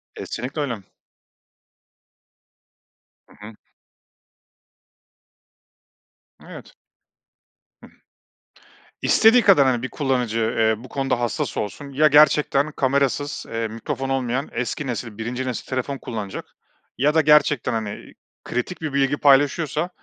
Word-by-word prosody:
Kesinlikle 130 +6 -5
öyle. 130 -6 -2 2.5
Hı - - -20
hı. 110 - -11 2.9
Evet. - - -12 1.1
Hı. - - -13 1.1
İstediği 225 +3 +5
kadar 180 -9 +6
hani 120 -2 +1
bir 130 - -3
kullanıcı, 125 -6 -1 0.2
eee, 110 0 +1
bu 130 - -12
konuda 135 -3 -1
hassas 120 -2 -2
olsun 140 +7 -5
ya 155 +3 +4
gerçekten 150 0 +4
kamerasız, 140 +1 -1
eee, 115 0 -2
mikrofon 115 +4 -5
olmayan 135 +1 -1
eski 125 +4 -3
nesil, 115 -3 -5
1. 120 +3 -4
nesil 125 - -4
telefon 130 +2 -3
kullanacak 105 -7 -6 0.5
ya 145 +4 +2
da 160 - +4
gerçekten, 150 -4 +3
hani, 110 -2 -5 0.3
kritik 125 +9 -4
bir 155 -3 -4
bilgi 140 +1 +1
paylaşıyorsa 145 +4 +2
135 Hz, 110 wpm, -22 LUFS, 120-145 Hz, 2.9 s, kadar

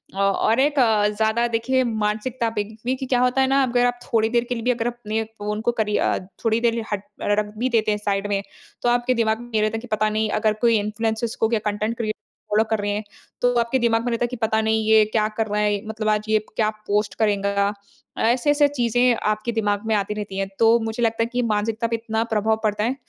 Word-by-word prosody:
अ, - - -9
और 200 +4 +2
एक 290 +2 +3 0.4
ज़्यादा 220 +2 +2
देखिए 245 +3 +1
मानसिकता 225 +2 -1
पे 210 - +1
देखिए 240 +5 -4
क्या 250 -1 +2
होता 250 +1 +2
है 265 - +3
ना? 275 +1 +3
अगर 245 -1 +2
आप 245 0 0
थोड़ी 220 -1 +1
देर 235 0 +2
के 245 - -1
लिए 230 - -5
भी 250 - +3
अगर 235 -1 -1
अपने 225 -2 -3
फ़ोन 210 -1 -5
को - - +4
करी 210 -1 +1
अ, - - +1 0.3
थोड़ी 225 0 +3
देर 235 -1 +1
हट 205 -1 -2 0.2
अ, - - -3
रख 210 0 -4
भी 250 +4 0
देते 220 -3 +2
हैं 210 - 0
साइड 200 -1 -1
में। 200 -1 0 0.4
तो 240 - +2
आपके 245 +1 +2
दिमाग 220 -2 +1
में 240 0 -12
ये 215 - +3
रहता 215 +1 0
है, - - -4
कि 245 - -10
पता 215 0 +2
नहीं 215 0 0
अगर 215 -1 +3
कोई 230 -1 +5
इन्फ्लुएंसेज़ 220 +2 -2
को 225 - +2
क्या 225 -2 +1
कंटेंट 215 +3 -3
क्रिएटर 215 -2 -2 0.4
फॉलो 210 +1 +3
कर 220 -1 +1
रहे 205 0 -1
हैं। 210 +1 -2 0.4
तो 245 0 +3
आपके 235 +3 +1
दिमाग 230 -1 +2
में 245 - 0
रहता 230 +1 -1
है - - +2
कि 250 - -6
पता 220 0 +2
नहीं 220 0 +1
ये 220 -1 +7
क्या 215 -1 +2
कर 220 -1 0
रहा 210 +1 -1
है? 205 0 0
मतलब 215 0 -2
आज 210 0 +1
ये 215 0 +4
प 215 - -18
क्या 215 -2 +2 0.2
पोस्ट 210 +1 0
करेगा? 200 -1 +1 0.4
ऐसे-ऐसे 290 +6 +3
चीज़ें 245 -2 +2
आपके 215 +2 -1
दिमाग 205 -3 0
में 220 - 0
आती 205 0 -1
रहती 205 -2 -6
हैं। 195 0 -1
तो 230 +1 +6
मुझे 225 +1 -3
लगता 230 0 +1
है - - 0
कि 245 - +1
मानसिकता 220 +1 0
पे 230 - -1
इतना 225 0 -2
प्रभाव 220 +1 +1
पड़ता 210 -1 0
है 245 +4 0
220 Hz, 250 wpm, -22 LUFS, 210-235 Hz, 0.4 s, ये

